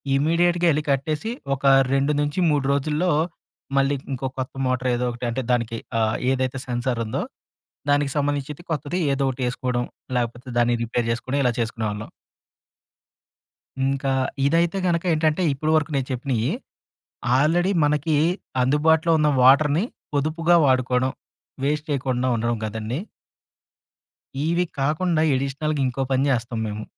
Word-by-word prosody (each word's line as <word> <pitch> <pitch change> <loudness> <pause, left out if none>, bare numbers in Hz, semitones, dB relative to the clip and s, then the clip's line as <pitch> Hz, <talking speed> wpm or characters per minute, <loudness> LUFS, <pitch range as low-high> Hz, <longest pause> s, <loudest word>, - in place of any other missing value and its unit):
ఇమ్మీడియేట్‌గా 170 +4 +2
ఎళ్ళి 150 +1 0
కట్టేసి, 150 +8 -1 0.3
ఒక 135 - -8 0.3
2 140 +2 +2
నుంచి 145 +4 -1
3 145 -2 +1
రోజుల్లో, 150 +5 +1 0.7
మళ్ళీ 140 +1 +3 0.2
ఇంకో 130 +1 -2
కొత్త 130 +2 -4
మోటార్ 130 0 0
ఏదో 125 - -1
ఒకటి 120 +1 -6
అంటే, 125 +3 -2
దానికి 115 -2 0 0.2
ఆహ్, 110 0 +1 0.2
ఏదైతే 130 0 -1
సెన్సార్ 120 0 -1
ఉందో, 110 - -2 0.7
దానికి 145 -1 +2
సంబంధించిది 145 +1 -2
కొత్తది 155 +4 -2
ఏదో 135 0 0
ఒకటి 130 +1 -5
ఏసుకోడం, 125 -1 -2 0.3
లేకపోతే 120 +1 -3
దాన్ని 120 0 +3
రిపేర్ 115 0 -1
చేసుకొని, 130 +4 -2
ఇలా 125 - +3
చేసుకునేవాళ్ళం. 110 -2 -3 1.8
ఇంకా, 135 0 0 0.4
ఇదైతే 170 +4 +2
గనక 170 -1 +1
ఏంటంటే, 155 +3 +1
ఇప్పుడు 155 +3 -1
వరకు 155 0 +1
నేను 135 -1 -1
చెప్పినయి, 125 -3 -1 0.9
ఆల్రెడీ 175 +7 +2
మనకీ 150 +1 +1 0.5
అందుబాటులో 160 +5 +3
ఉన్న 150 - +3
వాటర్‌ని, 150 - +5 0.3
పొదుపుగా 160 +4 +2
వాడుకోడం, 130 -1 +2 0.5
వేస్ట్ 150 +2 0
చేయకుండా 130 -2 0
ఉండడం 115 0 -1
గదండీ! 110 +5 -4 1.5
ఇవి 170 +2 +1
కాకుండా, 155 +4 +1
ఎడిషనల్‌గా 140 +2 -1
ఇంకో 130 +2 -3
పని 130 +1 +2
జేస్తాం 120 -1 -1
మేము. 105 0 -5
135 Hz, 130 wpm, -23 LUFS, 125-155 Hz, 1.8 s, వాటర్‌ని